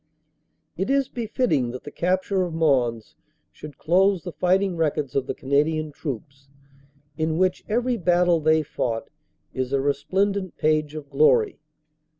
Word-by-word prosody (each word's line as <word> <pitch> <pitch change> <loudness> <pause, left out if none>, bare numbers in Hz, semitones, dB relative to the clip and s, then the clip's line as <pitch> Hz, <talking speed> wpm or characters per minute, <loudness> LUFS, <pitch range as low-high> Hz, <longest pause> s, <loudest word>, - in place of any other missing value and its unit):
"It 190 +7 -2
is 275 -1 +2
befitting 220 - 0
that 125 +1 -7
the 145 - -8
capture 185 +2 0
of 175 -3 -2
Mons 125 -8 +1 0.4
should 150 -3 -11
close 185 +1 +2
the 175 - -5
fighting 185 +2 +1
records 150 -4 -1
of 135 - 0
the - - -3
Canadian 150 +3 0
Troops, 135 -1 -7 0.7
in 160 0 0
which 185 0 +1
every 240 +2 0
battle 175 -2 +3
they 155 0 +3
fought 115 -3 -3 0.4
is 130 -1 -3
a 140 - +2
resplendent 185 +8 -1
page 155 -1 +1
of 150 -2 -7
glory. 155 - +3
160 Hz, 145 wpm, -24 LUFS, 140-185 Hz, 0.7 s, battle